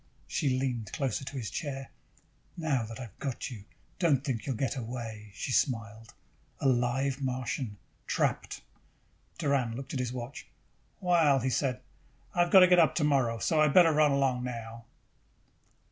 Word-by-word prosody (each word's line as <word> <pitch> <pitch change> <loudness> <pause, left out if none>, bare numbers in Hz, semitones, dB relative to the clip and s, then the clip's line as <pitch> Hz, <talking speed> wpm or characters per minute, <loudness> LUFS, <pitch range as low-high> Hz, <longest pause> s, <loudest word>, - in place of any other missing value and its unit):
She 130 -3 0
leaned 125 -4 -2
closer 135 -2 -1
to 135 +1 -6
his 115 -4 -4
chair. 135 -3 -5 0.7
"Now 150 -7 0
that 115 +3 -8
I've 120 -7 -10
got 135 -1 -4
you, 105 -5 -9 0.3
don't 150 -7 +3
think 130 -5 -3
you'll 135 - -1
get 135 +4 -1
away," 115 -3 -6
she - - -4
smiled. 115 -4 -1 0.4
"A 140 - +1
live 130 +2 +1
Martian, 125 -4 -3 0.3
trapped!" - - -1 0.8
Doran 140 -7 0
looked 135 +2 -7
at 135 - -2
his 125 -1 -2
watch. 125 +2 -7 0.5
"Well," 170 -7 +4
he 130 0 0
said, 125 0 0 0.5
"I - - -3
have 175 - +2
got 190 - +9
to 180 - +8
get 180 0 +6
up 160 - +4
tomorrow, 135 -7 +2
so 155 +7 +1
I - - +6
had 145 - 0
better 170 -3 +7
run 150 0 +4
along 135 -3 +1
now." 115 -2 -6
130 Hz, 165 wpm, -30 LUFS, 120-145 Hz, 0.8 s, got